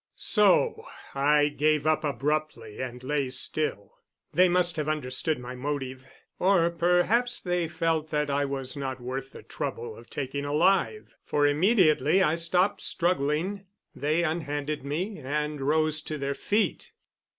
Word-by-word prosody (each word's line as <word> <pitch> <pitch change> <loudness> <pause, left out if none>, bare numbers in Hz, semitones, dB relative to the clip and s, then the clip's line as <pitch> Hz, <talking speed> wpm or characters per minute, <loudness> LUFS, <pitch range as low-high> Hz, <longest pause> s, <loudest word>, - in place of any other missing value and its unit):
So 220 - +3 0.3
I 145 +1 +3
gave 150 0 +1
up 155 0 +2
abruptly 145 -6 -2
and 125 -1 -6
lay 140 -1 -1
still. 130 -6 -2 0.3
They 180 +3 +5
must 175 -1 +2
have 155 0 -1
understood 150 +1 0
my 125 0 -7
motive 130 -1 -4 0.3
or 180 -3 +3
perhaps 180 +8 +2
they 175 -2 -1
felt 160 -1 -1
that 150 -1 0
I 140 0 0
was 135 -2 -3
not 135 -2 -4
worth 130 +2 -5
the - - -12
trouble 120 -6 -5
of 115 +1 -15
taking 140 0 -4
alive 180 - +1
for 145 0 +1
immediately 160 - +3
I 155 - +2
stopped 180 +4 +1
struggling 175 +3 -1 0.3
they 155 +4 0
unhanded 150 -3 -2
me 170 +9 -3
and 150 +1 -3
rose 155 +2 +1
to 155 - -5
their 140 0 -2
feet. 210 +9 -1
150 Hz, 140 wpm, -27 LUFS, 140-170 Hz, 0.3 s, They